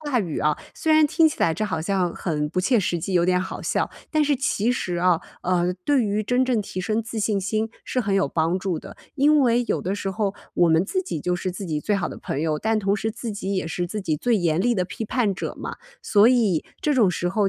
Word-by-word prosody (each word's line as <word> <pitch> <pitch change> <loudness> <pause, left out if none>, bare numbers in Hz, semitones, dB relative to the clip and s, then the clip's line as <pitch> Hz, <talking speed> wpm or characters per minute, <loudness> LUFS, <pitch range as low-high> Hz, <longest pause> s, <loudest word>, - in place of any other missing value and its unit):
话 290 -5 0
语 175 -8 -2
啊， 150 0 +1 0.2
虽 320 -1 +1
然 310 -1 +6
听 320 +2 +4
起 300 - -7
来 165 - +3
这 215 - -1
好 205 -6 -2
像 180 0 0
很 150 -4 -2
不 185 +3 -1
切 230 +4 +3
实 175 -2 -1
际， 190 +4 -4
有 175 -1 +3
点 180 0 +2
好 185 - -5
笑， - - 0 0.2
但 310 -1 +2
是 290 0 +2
其 245 -3 0
实 180 -7 -2
啊， 175 -1 +3 0.2
呃， 180 0 +1
对 285 -3 +3
于 210 -1 0
真 245 +4 +1
正 250 -4 +1
提 185 -2 -5
升 215 +4 0
自 220 0 -5
信 205 -1 +1
心 215 +3 -1 0.2
是 255 - -1
很 205 -4 -1
有 195 - +2
帮 165 +5 0
助 190 -2 -2
的。 - - -9 0.2
因 300 +2 +4
为 245 -3 +3
有 - - 0
的 190 +2 -2
时 195 -1 -3
候 200 0 -1 0.2
我 175 - +4
们 160 +3 +4
自 375 - -1
己 360 - -4
就 180 +2 0
是 185 +1 -3
自 190 +2 -6
己 155 -4 -2
最 205 +7 0
好 190 -5 -1
的 - - -8
朋 140 - -3
友， 155 -1 0
但 220 0 +1
同 200 +1 +1
时 220 +2 -2
自 235 0 -5
己 200 -1 -3
也 185 -3 -2
是 175 +1 -2
自 210 +4 -4
己 160 -6 -1
最 235 +9 +1
严 170 -2 +1
厉 240 +2 +2
的 185 -3 0
批 205 +4 -6
判 220 -2 +1
者 190 - -5
嘛。 - - -6 0.3
所 205 +1 +5
以 225 -10 +3 0.2
这 300 - +1
种 235 -8 +4
时 175 0 -1
候， 195 +1 +1
200 Hz, 285 characters per minute, -23 LUFS, 175-230 Hz, 0.3 s, 然